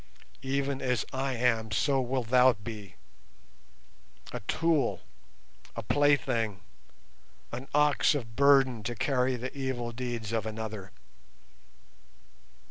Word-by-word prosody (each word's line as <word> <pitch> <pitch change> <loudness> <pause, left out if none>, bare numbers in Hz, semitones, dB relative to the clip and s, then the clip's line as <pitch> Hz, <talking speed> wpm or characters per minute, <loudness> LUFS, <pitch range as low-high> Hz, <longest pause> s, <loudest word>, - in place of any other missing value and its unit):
Even 135 0 -1
as 125 -3 0
I 135 0 -1
am 115 -2 +1
so 135 +3 +2
wilt 125 -2 -2
thou 125 0 +6
be—a 105 -2 -9 1.5
tool, 165 -3 +1 0.7
a 115 - -4
plaything, 120 -6 +1 0.9
an 125 +3 -6
ox 150 +1 +4
of 115 -5 -5
burden 135 -4 +5
to 120 +3 -4
carry 130 +1 +1
the 125 +2 -6
evil 130 -3 -3
deeds 120 -3 -4
of 110 -2 -1
another. 110 -3 -6
125 Hz, 105 wpm, -29 LUFS, 115-135 Hz, 1.5 s, thou